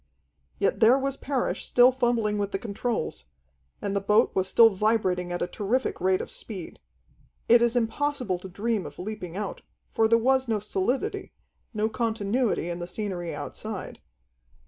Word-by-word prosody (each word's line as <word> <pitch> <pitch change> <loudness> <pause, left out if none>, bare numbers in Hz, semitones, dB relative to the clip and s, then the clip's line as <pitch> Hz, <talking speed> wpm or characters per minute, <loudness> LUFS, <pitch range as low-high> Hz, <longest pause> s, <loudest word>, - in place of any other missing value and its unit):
Yet 200 - +1
there 235 +3 +6
was 275 0 -2
Parrish 275 -2 -2
still 245 +1 +5
fumbling 235 -5 0
with 200 -1 -2
the - - -1
controls, 215 - -3 0.6
and 200 0 -1
the 200 - +1
boat 210 +4 +3
was 190 -1 +1
still 225 +3 +6
vibrating 190 -3 0
at 175 - -1
a - - +1
terrific 220 +5 -1
rate 185 0 +2
of - - -7
speed. 190 -7 -7 0.7
It 235 0 +6
is 235 0 +2
impossible 245 -4 0
to 190 - -9
dream 210 +1 -2
of - - -12
leaping 185 -2 -6
out, 210 -1 -4 0.3
for 225 - +3
there 230 +1 +5
was 260 +2 +2
no 225 -2 +1
solidity, 210 +4 -2 0.4
no 215 -1 0
continuity 225 -2 0
in 175 0 -4
the 175 - -5
scenery 180 -3 -4
outside. - - -6
215 Hz, 165 wpm, -26 LUFS, 190-240 Hz, 0.7 s, there